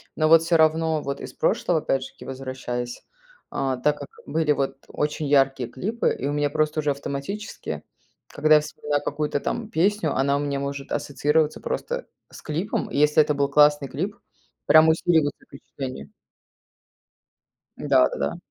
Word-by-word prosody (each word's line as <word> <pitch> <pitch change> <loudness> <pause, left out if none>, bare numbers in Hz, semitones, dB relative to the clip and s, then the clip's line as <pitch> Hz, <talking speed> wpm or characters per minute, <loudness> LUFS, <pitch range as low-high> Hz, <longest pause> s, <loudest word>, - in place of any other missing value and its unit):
Но 155 -1 +2
вот 165 0 +7
всё 165 0 +2
равно, 160 0 +2
вот 140 0 -4
из - - -8
прошлого 165 -3 +1
опять 135 -2 0
же - - -8
таки - - -14
возвращаясь, 130 -2 -5 0.5
а, 130 -2 -1
так 150 +3 +1
как - - -8 0.2
были 160 -2 +1
вот 135 -1 -1
очень 150 0 -2
яркие 135 -3 +2
клипы, 215 - -1
и - - -4
у 145 - -1
меня 145 0 +1
просто 155 +1 0
уже 150 - 0
автоматически, 140 +9 -5 0.5
когда 155 +1 +4
я 150 - +5
вспоминаю 150 -1 -3
какую-то 150 0 -1
там 225 +7 -3
песню, 180 -3 +1
она 140 +1 +2
у - - 0
меня 140 -1 -2
может 140 0 -5
ассоциироваться 150 +2 0
просто - - -3 0.2
с - - -12
клипом, 165 +6 -2
если 150 +2 +4
это 150 -1 +1
был 140 0 +1
классный 145 -1 +4
клип, 190 +8 -3 0.5
прям 155 0 +7
усиливается 160 -2 +1
впечатление. 135 +2 -8 1.7
Да - - +3
да - - -6
да. - - -2
150 Hz, 160 wpm, -24 LUFS, 140-160 Hz, 1.7 s, вот